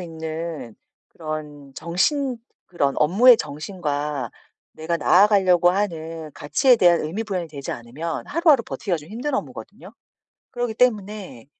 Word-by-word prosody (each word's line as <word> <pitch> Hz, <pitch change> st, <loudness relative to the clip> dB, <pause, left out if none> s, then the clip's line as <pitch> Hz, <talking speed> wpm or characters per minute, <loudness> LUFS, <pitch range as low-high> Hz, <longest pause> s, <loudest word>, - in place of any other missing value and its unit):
있는 160 Hz, -6 st, -6 dB, 0.3 s
그런 150 Hz, -3 st, -7 dB
정신 245 Hz, -, 0 dB, 0.3 s
그런 140 Hz, -6 st, -1 dB
업무의 215 Hz, +11 st, +6 dB
정신과 150 Hz, -, -4 dB, 0.4 s
내가 160 Hz, +2 st, -3 dB
나아가려고 180 Hz, 0 st, +4 dB
하는 165 Hz, -5 st, -3 dB
가치에 250 Hz, -, +3 dB
대한 175 Hz, -4 st, +4 dB
의미 180 Hz, +9 st, -4 dB
부여가 185 Hz, -5 st, -3 dB
되지 140 Hz, -3 st, -6 dB
않으면 140 Hz, +8 st, -6 dB
하루하루 310 Hz, -5 st, +3 dB
버티기가 185 Hz, -4 st, -3 dB
좀 155 Hz, 0 st, -12 dB
힘든 245 Hz, +7 st, -4 dB
업무거든요. -, -, -7 dB, 0.6 s
그러기 245 Hz, -2 st, -3 dB
때문에 210 Hz, -, -1 dB
170 Hz, 310 characters per minute, -22 LUFS, 155-210 Hz, 0.6 s, 업무의